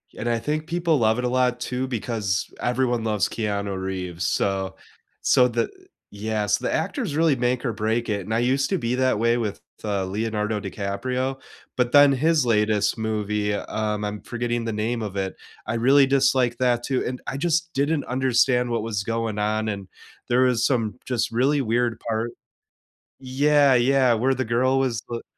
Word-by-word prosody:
And 120 - -3
I 115 -1 +1
think 155 +5 -2
people 170 -2 +1
love 110 -1 +2
it 125 - -1
a - - +1
lot, 125 -1 +1
too, 125 +1 -3
because 110 -6 -2
everyone 120 -1 0
loves 105 -3 +1
Keanu 100 -3 -3
Reeves. 90 -2 -4
So 95 0 -1 0.5
so 125 - +4
the 120 -1 -1 0.4
yeah, 105 +1 -2
so, 100 - +1
the - - 0
actors 145 - -2
really 160 -4 +3
make 125 +1 -1
or 120 - 0
break 110 +2 -1
it, 105 -2 -1
and 105 +4 -5
I 110 - +2
used 130 +3 +1
to 190 - +1
be 120 -3 -1
that 130 -4 +1
way 115 +1 +3
with, 110 -4 -3 0.2
uh, 100 -3 -1
Leonardo 105 +2 -2
DiCaprio, 125 +7 -3 0.4
but 125 -1 +1
then 145 -1 +7
his 155 0 +2
latest 105 -1 +2
movie, 105 -1 -1
um, 105 0 -2
I'm 105 0 -4
forgetting 120 0 -3
the 115 - -2
name 110 +2 -2
of 100 -2 -5
it, 95 -1 -2 0.3
I 110 - -2
really 135 +4 +5
disliked 130 -3 +2
that, 120 -2 +2
too. 130 -2 -1
And 125 0 -3
I - - -3
just 170 +3 0
didn't 145 +1 0
understand 125 -1 +2
what 115 -2 -1
was 105 -3 -2
going 115 -1 -2
on 110 +1 0
and 100 -3 -4 0.4
there 125 +1 +3
was 125 -3 +2
some 115 -7 0
just 125 -3 -1
really 135 +5 +2
weird 120 0 0
part 115 +1 -1 0.9
yeah, 145 +1 +4
yeah. 130 0 +4
Where 130 +4 +2
the 130 - -1
girl 130 +4 +2
was 125 -4 0
th 120 -1 -4
120 Hz, 185 wpm, -24 LUFS, 105-130 Hz, 0.9 s, then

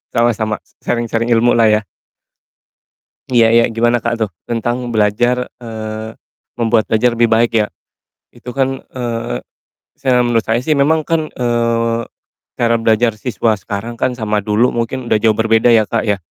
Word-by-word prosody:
sama 120 0 +4
sama, 110 -1 -2
s - - -33
sharing-sharing 115 -1 -1
ilmu 120 0 +3
lah 115 - +5
ya. 105 0 +2 1.5
Iya 115 -2 +5
iya, 115 +1 +5
gimana, 120 +1 +2
Kak, 120 0 -2
tuh 110 - 0 0.2
tentang 120 +1 -2
belajar 120 +4 +1
eee, 110 -2 -6 0.5
membuat 115 -1 +2
belajar 120 +2 +1
lebih 120 - +4
baik 115 +1 +2
ya. 105 -1 +2 0.7
Itu 120 +1 -9
kan, 135 +1 -1
eee, 120 -2 -3 0.6
se 135 - -4
menurut 120 -2 +3
saya 115 +1 0
sih 155 - +3
memang 150 +2 +2
kan, 160 -2 -1
eee, 115 -1 0 0.6
cara 115 -1 +2
belajar 115 +1 +2
siswa 115 0 -1
sekarang 105 +3 -6
kan 125 -1 0
sama 105 -2 -1
dulu 105 +5 +1
mungkin 120 +2 -3
udah 110 - +4
jauh 110 -1 +3
berbeda 115 +1 +3
ya, 115 -2 +5
Kak, 115 0 -1
ya 100 - +2
115 Hz, 160 wpm, -16 LUFS, 110-120 Hz, 1.5 s, lah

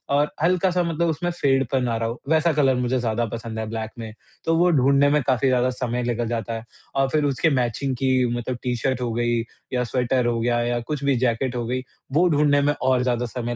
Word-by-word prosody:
और 145 +1 +4
अ, 150 - -9
हल्का 180 +2 +3
सा 180 0 +1
मतलब 170 0 0
उसमें 165 +3 -1
फेडपन 135 -5 +1
आ 115 - 0
रहा 115 0 -1
हो, 120 - -7
वैसा 160 +1 +3
कलर 135 -3 +3
मुझे 125 +1 0
ज़्यादा 120 0 0
पसंद 115 0 -6
है 110 - -2
ब्लैक 110 -1 -4
में। 110 -2 -7 0.3
तो 165 - +2
वो 175 +2 +4
ढूँढ़ने 140 -1 +4
में 150 +1 +3
काफ़ी 130 +1 +2
ज़्यादा 125 -1 +2
समय 125 -1 -2
निकल 120 -1 -1
जाता 115 0 -3
है 115 0 -5 0.3
और 135 0 +2
फिर 150 +2 +1
उसके 145 +3 +2
मैचिंग 130 0 -1
की 130 +1 +1 0.3
मतलब 120 +1 -4
टी 125 -1 0
शर्ट 130 +1 -1
हो 120 -2 -1
गई 120 0 +1 0.3
या 125 -1 +1
स्वेटर 125 +1 0
हो 120 -1 0
गया 120 +1 +1
या 120 0 0
कुछ 140 +4 -5
भी 140 -1 +2
जैकेट 125 +1 0
हो 120 -1 -2
गई, 125 +2 -2 0.3
वो 165 +6 +4
ढूँढने 145 -2 +3
में 145 +1 +2
और 130 -1 +2
ज़्यादा 125 -1 0
समय 120 0 -4
125 Hz, 240 wpm, -23 LUFS, 120-145 Hz, 0.3 s, और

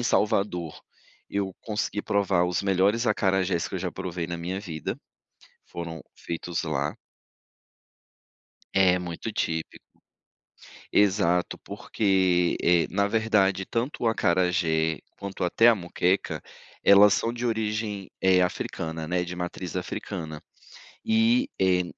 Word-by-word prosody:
Em - - -1
Salvador, 100 -8 0 0.5
eu 100 -1 -2
consegui 105 -1 -3
provar, 100 -3 +2
os 90 +1 -1
melhores 100 +5 +2
acarajés, 95 -4 +1
que - - -8
eu - - -1
já - - -3
provei 85 -2 -4
na 85 - -4
minha 90 +3 -4
vida, 80 -6 -5 0.7
foram 85 -2 -7
feitos 85 0 -4
lá. 70 +2 -2 1.8
É 95 -2 +4
muito 90 +5 -5
típico. 80 -5 -2 1.1
Exato, 95 -3 +2
porque, 95 -4 +1
eh, 85 -1 +4
na 100 +1 +1
verdade, 100 -3 +2
tanto 120 +2 -2
o - - +2
acarajé, 85 -5 +1 0.2
quanto 100 -1 -6
até 90 +6 +3
a 115 - +7
moqueca, 90 0 -1 0.4
elas 100 0 +7
são 115 - 0
de 120 0 -5
origem 110 -3 -2 0.4
africana, 80 -2 -4
eh, - - -6
né, 90 0 0
de 90 0 -6
matriz 90 0 -5
africana. 85 -3 -5 0.7
E, 230 +5 +3
eh, 90 -1 +3
95 Hz, 125 wpm, -26 LUFS, 85-105 Hz, 1.8 s, a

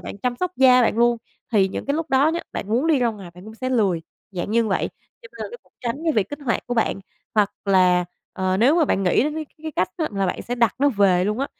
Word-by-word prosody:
bạn 200 - -8
chăm 245 +2 -2
sóc 365 +6 -2
da 255 -1 +6
bạn 225 - +1
luôn. 240 0 +4 0.4
Thì 195 -3 +4
những - - -5
cái 280 - 0
lúc 320 0 -3
đó 270 +3 +4
nhá, 335 +2 -1
bạn 200 - -5
muốn 245 +8 +1
đi 315 -4 +3
ra 245 -2 +2
ngoài 200 -6 -7
bạn 180 +1 -13
cũng 220 +1 -10
sẽ 255 +3 -4
lười, 195 -9 +1 0.3
dạng 185 0 -4
như 230 +1 +2
vậy, 200 - 0 0.3
cho 470 - -12
nên - - -6
nó 475 - -8
cũng - - -32
tránh 235 0 -2
cái 320 - +2
việc 210 -6 +1
kích 290 - -6
hoạt 235 - -1
của 245 - -2
bạn. 225 -3 0 0.3
Hoặc 210 -2 +3
là, 185 -2 +4 0.3
ờ, 185 0 0
nếu 260 - +4
mà 335 - +4
bạn 195 - 0
nghĩ 180 +3 +3
đến 300 - -2
cái 315 0 -3 0.2
cái 315 - -5
cách 185 - +2
đó 315 - 0
là 195 -1 0
bạn - - -3
sẽ 245 - -3
đặt 235 -2 +2
nó 285 +2 +4
về 195 -7 +3
luôn 210 +3 -1
á, 275 - 0
230 Hz, 285 wpm, -22 LUFS, 195-275 Hz, 0.4 s, da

